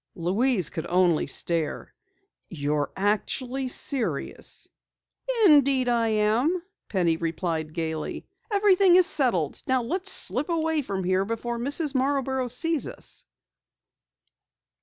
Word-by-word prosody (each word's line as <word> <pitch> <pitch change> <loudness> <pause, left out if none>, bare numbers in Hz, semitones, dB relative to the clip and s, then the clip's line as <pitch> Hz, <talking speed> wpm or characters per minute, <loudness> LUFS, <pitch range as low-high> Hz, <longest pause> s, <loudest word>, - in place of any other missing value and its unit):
Louise 190 - +1
could 160 - -5
only 175 -3 +2
stare. 160 0 -2 0.6
"You're 145 -2 -2
actually 245 +6 -1
serious!" 255 0 -3 0.8
"Indeed 280 -6 +5
I 235 -1 +1
am," 225 +11 +1 0.3
Penny 175 -5 +1
replied 165 -1 -3
gaily. 160 -2 -4 0.3
"Everything 395 -3 +5
is 365 -1 +7
settled. 210 - +1
Now 260 -1 +1
let's 370 +10 -1
slip 295 - +2
away 320 -2 0
from 195 -7 -4
here 185 +1 +1
before 230 +3 -4
Mrs. 285 +4 +1
Marborough 265 -1 0
sees 315 +5 -1
us." - - -7
240 Hz, 110 wpm, -25 LUFS, 175-285 Hz, 0.8 s, is